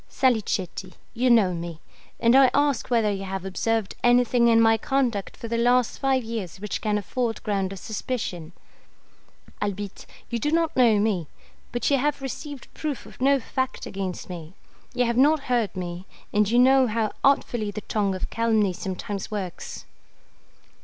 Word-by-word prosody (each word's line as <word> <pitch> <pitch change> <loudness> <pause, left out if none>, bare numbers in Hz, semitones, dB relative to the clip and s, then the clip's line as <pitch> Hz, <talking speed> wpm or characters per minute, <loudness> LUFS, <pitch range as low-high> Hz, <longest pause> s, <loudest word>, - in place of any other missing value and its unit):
Salicetti, 200 -7 0 0.2
you 250 +2 +1
know 215 -6 +5
me; 170 -1 -6 0.4
and 235 +1 +4
I 270 -1 +7
ask 285 -3 +1
whether 225 -4 +2
you 195 -1 -3
have 190 0 -4
observed 220 +2 -1
anything 240 0 +4
in 230 -1 +5
my 225 0 +5
conduct 235 -4 -1
for 230 - -6
the 230 0 -1
last 245 0 +2
five 265 -2 +1
years 220 -7 -5
which 210 0 -4
can 210 -1 +1
afford 230 +3 -2
ground 195 -3 -1
of 195 - -6
suspicion? 190 -5 -4 1.1
Albitte, 205 -1 -4 0.2
you 235 - -1
do 295 +6 0
not 330 0 +1
know 235 -4 +5
me; 200 -6 0 0.4
but 240 +3 0
you 275 - +4
have 290 +2 0
received 275 +1 -7
proof 300 -4 -4
of - - -15
no 275 +1 +4
fact 260 +2 -3
against 190 -2 -5
me; 170 -1 -8 0.4
you 245 0 +2
have 235 0 0
not 295 +3 +5
heard 240 -7 0
me, 180 0 -5 0.3
and 210 -1 +3
you 235 - +2
know 260 +1 +6
how 220 -1 0
artfully 240 -6 +2
the 205 +1 -5
tongue 200 -3 -1
of 185 - -5
calumny 220 -4 +2
sometimes 190 +2 -5
works. 195 -5 -6
225 Hz, 165 wpm, -25 LUFS, 195-250 Hz, 1.1 s, I